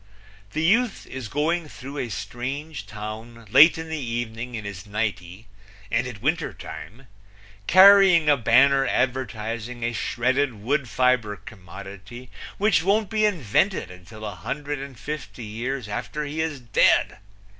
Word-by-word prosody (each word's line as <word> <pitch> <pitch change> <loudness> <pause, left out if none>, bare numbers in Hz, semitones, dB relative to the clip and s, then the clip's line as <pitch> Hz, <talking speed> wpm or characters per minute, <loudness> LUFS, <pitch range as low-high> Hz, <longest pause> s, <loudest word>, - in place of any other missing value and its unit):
The 155 - -1
youth 220 +5 +2
is 130 -3 -7
going 155 +5 -1
through 140 +2 -8
a 120 - -3
strange 125 +5 -5
town 110 +2 -8
late 150 +7 +8
in 160 0 -6
the 160 -1 -4
evening 120 0 -4
in 110 -2 -6
his 100 0 -7
nightie, 105 -2 -4 0.5
and 115 +2 +1
it 115 -5 -9
winter - - 0
time, 125 +7 -10 0.6
carrying 190 -3 +7
a 145 - +6
banner 135 +3 +4
advertising 120 -2 -2
a 120 0 -1
shredded 130 +4 0
wood 125 +5 -1
fiber 125 -5 +1
commodity 100 +3 -11 0.3
which 205 -4 +3
won't 200 +3 +1
be 215 -1 +2
invented 170 - 0
until 95 +5 -11
a 105 - -4
hundred 140 - -5
and 135 -2 -8
fifty 135 -1 -6
years 120 +3 -4
after 120 +8 -4
he 150 +2 -3
is 160 -3 -3
dead! 120 -3 +2
125 Hz, 145 wpm, -24 LUFS, 110-150 Hz, 0.6 s, late